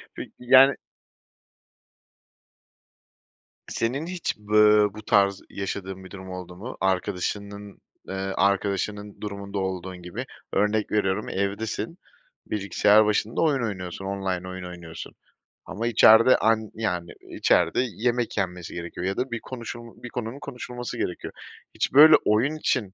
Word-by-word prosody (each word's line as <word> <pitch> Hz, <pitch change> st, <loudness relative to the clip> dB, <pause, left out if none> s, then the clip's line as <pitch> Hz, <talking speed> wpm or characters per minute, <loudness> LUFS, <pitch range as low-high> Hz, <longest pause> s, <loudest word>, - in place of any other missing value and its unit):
Peki, -, -, -8 dB
yani 130 Hz, +2 st, +6 dB, 2.9 s
Senin 130 Hz, +7 st, -2 dB
hiç, 180 Hz, -1 st, -3 dB, 0.2 s
ııı, 105 Hz, -1 st, +5 dB
bu 110 Hz, -, -9 dB
tarz 100 Hz, -1 st, +3 dB
yaşadığın 95 Hz, -1 st, -5 dB
bir 95 Hz, -, -12 dB
durum 95 Hz, -1 st, -9 dB
oldu 90 Hz, -1 st, -8 dB
mu? 115 Hz, +8 st, -8 dB
Arkadaşının, 100 Hz, +2 st, -2 dB, 0.3 s
ııı, 95 Hz, 0 st, -3 dB
arkadaşının 100 Hz, +1 st, -1 dB
durumunda 100 Hz, -1 st, -6 dB
olduğun 95 Hz, -1 st, -4 dB
gibi? 90 Hz, 0 st, -6 dB, 0.3 s
Örnek 105 Hz, +1 st, +1 dB
veriyorum, 105 Hz, -1 st, 0 dB
evdesin, 105 Hz, -, -3 dB, 0.5 s
bilgisayar 105 Hz, +1 st, +3 dB
başında 105 Hz, +1 st, 0 dB
oyun 145 Hz, -6 st, +2 dB
oynuyorsun, 95 Hz, -3 st, -5 dB
online 95 Hz, -2 st, -3 dB
oyun 95 Hz, 0 st, -7 dB
oynuyorsun 85 Hz, -2 st, -9 dB, 0.5 s
ama 115 Hz, +5 st, -3 dB
içeride 115 Hz, +2 st, +7 dB
an 110 Hz, -1 st, +1 dB
yani, 90 Hz, -6 st, -2 dB, 0.2 s
içeride -, -, +2 dB
yemek 120 Hz, 0 st, -1 dB
yenmesi 90 Hz, -3 st, -3 dB
gerekiyor 85 Hz, +1 st, -6 dB
ya 95 Hz, -, -2 dB
da 125 Hz, 0 st, -2 dB
bir 120 Hz, -, -2 dB
konuşul 120 Hz, -2 st, -9 dB
bir 125 Hz, -, -6 dB
konunun 120 Hz, +2 st, -5 dB
konuşulması 125 Hz, -3 st, -7 dB
gerekiyor. 90 Hz, -, -4 dB, 0.4 s
Hiç -, -, -1 dB
böyle 155 Hz, +3 st, +9 dB
oyun 120 Hz, +9 st, +2 dB
için 125 Hz, -10 st, -1 dB
105 Hz, 125 wpm, -25 LUFS, 95-115 Hz, 2.9 s, böyle